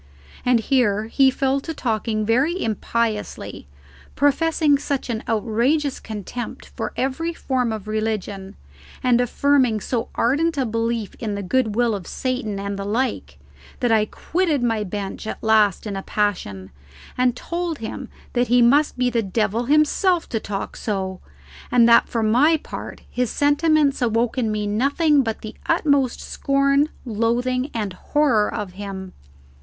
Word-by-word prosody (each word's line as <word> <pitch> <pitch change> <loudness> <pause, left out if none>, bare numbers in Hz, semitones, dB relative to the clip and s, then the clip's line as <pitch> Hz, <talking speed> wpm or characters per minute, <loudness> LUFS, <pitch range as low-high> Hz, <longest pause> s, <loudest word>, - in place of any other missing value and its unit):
And 245 -2 +3
here 220 -4 +2
he 265 +4 +3
fell 270 +1 0
to 320 +3 -6
talking 220 -3 -1
very 270 - +2
impiously, 220 - -2 0.5
professing 290 +1 +3
such 275 -3 -2
an 220 -1 -3
outrageous 245 +6 +1
contempt 220 +3 -7
for - - -3
every 325 +6 -1
form 255 -6 -1
of 215 -2 -5
religion, 215 -3 -3 0.5
and 245 -1 +4
affirming 255 -2 +2
so 230 +2 -2
ardent 295 +6 +1
a 265 - +1
belief 230 -1 -2
in 215 -3 -3
the 200 - -4
goodwill 230 +2 +1
of 195 -4 -5
Satan 250 -6 -3
and 200 0 -4
the - - -3
like, 230 +6 -2 0.4
that 245 -2 +1
I 215 -1 +3
quitted 325 -4 -1
my 225 -3 +1
bench 200 +2 -5
at - - -6
last 215 -3 +3
in 205 -2 -4
a 195 - -3
passion, 140 - -2 0.4
and 250 -1 +2
told 340 +2 -3
him 245 +2 -6 0.2
that 245 0 +1
he 245 +1 +4
must 285 +5 +4
be 250 0 +1
the 230 -1 +1
devil 215 +3 -1
himself 305 +5 +3
to 225 - -1
talk 200 -2 -5
so, 190 -3 -3 0.5
and 235 -2 +6
that 235 - +6
for 230 -2 -1
my 265 +9 +4
part - - -8
his 250 -2 -1
sentiments 290 0 +2
awoke 230 0 +1
in 235 -4 0
me 210 -1 -1
nothing 280 +8 +2
but 225 -4 -3
the 215 - -7
utmost 285 -6 +2
scorn, 275 +1 +1 0.2
loathing, 245 +4 0
and 210 -5 -3
horror 245 -1 +1
of 210 -4 -4
him. 190 -1 -7
235 Hz, 150 wpm, -22 LUFS, 215-275 Hz, 0.5 s, and